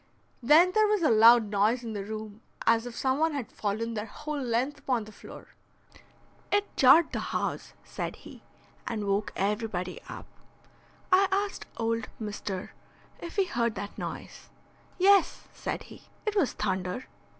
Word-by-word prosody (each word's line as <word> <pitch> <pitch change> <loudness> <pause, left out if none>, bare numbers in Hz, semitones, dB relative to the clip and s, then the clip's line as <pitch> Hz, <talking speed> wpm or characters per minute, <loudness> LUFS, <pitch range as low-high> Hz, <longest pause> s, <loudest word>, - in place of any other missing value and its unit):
Then 310 +9 +6
there 430 +2 +4
was 420 -4 +1
a 300 - +4
loud 225 -1 +6
noise 215 +5 +2
in 225 -2 -5
the 200 -2 -4
room 215 +1 -7 0.2
as 230 +1 +3
if 240 - -8
some 265 +1 0
one 320 0 +2
had 265 -5 -4
fallen 220 +3 -2
their 215 0 -4
whole 300 +5 -5
length 250 +3 -1
upon 250 -4 -1
the 215 - -12
floor. - - -12 1.0
"It 410 0 0
jarred 290 +5 +6
the - - -2
house," - - -3
said - - -5
he, - - -13 0.5
"and 220 -4 -3
woke 200 +1 0
everybody 200 -2 -2
up. - - -8 0.9
I 380 +1 +6
asked 400 +1 -1
old 230 0 -1
Mr. 205 -3 -5 0.5
if 340 - -8
he 395 -2 +3
heard 235 -9 -1
that 200 +1 -6
noise. - - -7 0.5
'Yes,' 390 0 +4
said - - -4
he, - - -14 0.2
'it 425 -1 -1
was 355 -10 +2
thunder.' 190 +3 -2
230 Hz, 160 wpm, -28 LUFS, 210-305 Hz, 1.0 s, Then